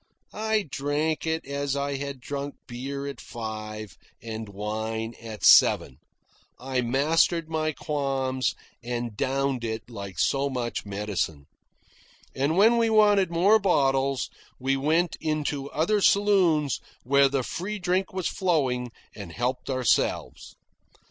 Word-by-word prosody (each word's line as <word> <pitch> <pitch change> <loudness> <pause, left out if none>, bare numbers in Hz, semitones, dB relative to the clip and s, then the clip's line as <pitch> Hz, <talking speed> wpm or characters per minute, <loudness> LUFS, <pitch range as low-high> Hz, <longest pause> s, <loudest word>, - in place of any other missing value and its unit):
I 220 0 0
drank 150 +4 -1
it 160 0 -1
as 140 0 -2
I 140 0 -1
had 140 -1 -6
drunk 140 +2 -5
beer 135 +3 -5
at 140 -4 -6
five, 110 -3 -7 0.2
and 110 -2 -6
wine 110 +3 -3
at 110 -2 -8
seven. 65 - +6 0.6
I 130 0 -1
mastered 155 +6 +2
my 155 -1 0
qualms 135 -3 -1 0.3
and 120 -2 -3
downed 135 +1 -1
it 110 +1 -4
like 100 -5 -7
so 140 +1 +1
much 120 -5 -3
medicine. 100 -8 -3 0.9
And 140 +5 0
when 225 +4 +6
we 230 -1 +3
wanted 205 -3 +4
more 190 +6 +4
bottles, 135 - +1 0.3
we 135 +1 +1
went 160 +5 +1
into 150 -3 -2
other 205 +7 +1
saloons 185 -9 +3 0.2
where 140 +2 +4
the 135 -1 0
free 195 - -4
drink 185 0 0
was 185 -2 -2
flowing, 135 -9 0 0.3
and 100 -5 -8
helped 125 +7 -2
ourselves. 130 -3 0
140 Hz, 130 wpm, -26 LUFS, 120-160 Hz, 0.9 s, seven